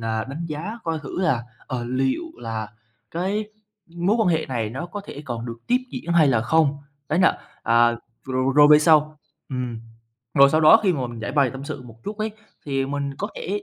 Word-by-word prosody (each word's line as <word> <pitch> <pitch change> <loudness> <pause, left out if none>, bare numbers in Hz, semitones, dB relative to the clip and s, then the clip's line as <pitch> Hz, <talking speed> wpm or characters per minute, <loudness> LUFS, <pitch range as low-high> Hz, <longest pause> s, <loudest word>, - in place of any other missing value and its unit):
là 110 -1 -2
đánh 150 +5 -5
giá 170 +10 -5
coi 165 -1 -1
thử 150 +4 -5
là, 155 -11 +1 0.2
ờ, 125 -2 -3
liệu 130 - 0 0.2
là 110 -2 -4 0.4
cái 195 +5 -1 0.4
mối 175 +5 0
quan 215 -5 +3
hệ 160 -2 +1
này 115 -5 -2
nó 135 +9 -5
có 205 +4 -6
thể 145 - -8
còn 120 -3 -5
được 115 0 -6
tiếp 250 +1 +3
diễn 175 -9 -4
hay 160 -4 +5
là 120 -4 +3
không. 145 +4 +2 0.3
Đấy 155 - +1
là, 185 - +4 0.2
à, 115 0 +4 0.3
rồi 130 0 0
rồi 145 0 +8
về 150 - +9
sau 155 -1 +4 0.3
ừm, 125 -4 -4 0.5
rồi 140 -1 +7
sau 155 - +3
đó 160 +8 +8
khi 190 -4 +3
mà 135 -6 -2
mình 120 -1 -8
giãi 115 - -4
bày 140 -3 +3
tâm 135 +2 -8
sự 145 -2 -6
một 115 -2 -15
chút 205 +1 -5
ấy, 215 +1 -1 0.4
thì 135 -1 0
mình 140 0 -3
có 205 - -2
thể 205 +2 -3
145 Hz, 215 wpm, -23 LUFS, 125-170 Hz, 0.5 s, về